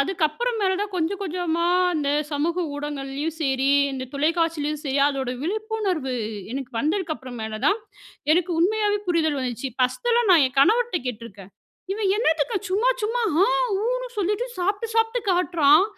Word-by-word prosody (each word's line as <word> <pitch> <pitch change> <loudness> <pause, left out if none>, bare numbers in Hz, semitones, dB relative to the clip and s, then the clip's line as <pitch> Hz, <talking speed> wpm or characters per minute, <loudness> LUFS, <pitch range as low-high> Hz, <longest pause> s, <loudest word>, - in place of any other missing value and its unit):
அதுக்கு 335 +4 -1
அப்புறம் 475 +9 -2
மேல 380 -1 +3
தான் 410 0 -3
கொஞ்சம் 365 +4 -1
கொஞ்சமா 340 -2 -1 0.3
இந்த 285 -2 0 0.2
சமூக 335 +5 0
ஊடகங்கள்லயும் 290 +1 -4
செரி, 270 -1 +1 0.2
இந்த 260 -1 -4
தொலைக்காட்சிலயும் 305 0 0
சரி 275 0 0
அதோட 270 -3 -2
விழிப்புணர்வு 395 - -2 0.4
எனக்கு 265 -1 -5
வந்ததற்கு 330 - 0
அப்றமேல 230 -4 -6
தான் 400 +6 +3 0.5
எனக்கு 355 +1 +2
உண்மையாவே 415 +2 +2
புரிதல் 315 -4 +1
வந்துச்சி. 255 +1 -3
ஃபர்ஸ்ட்டெலாம் 470 - +2
நான் 315 -5 +6
என் 255 - -8
கணவர்ட 460 +5 +3
கேட்ருக்கேன். 210 -5 -7 0.4
"இவன் 400 -2 +1
என்னத்துக்குங்க 325 -2 +1 0.2
சும்மா 440 +6 +3
சும்மா 465 +3 0 0.2
ஆ - - +2 0.4
ஊனு - - -1
சொல்லிட்டு 415 +5 0
சாப்ட்டு 400 +5 -1
சாப்ட்டு 450 +2 +2
காட்றான். 340 -2 +4
330 Hz, 145 wpm, -24 LUFS, 280-415 Hz, 0.5 s, நான்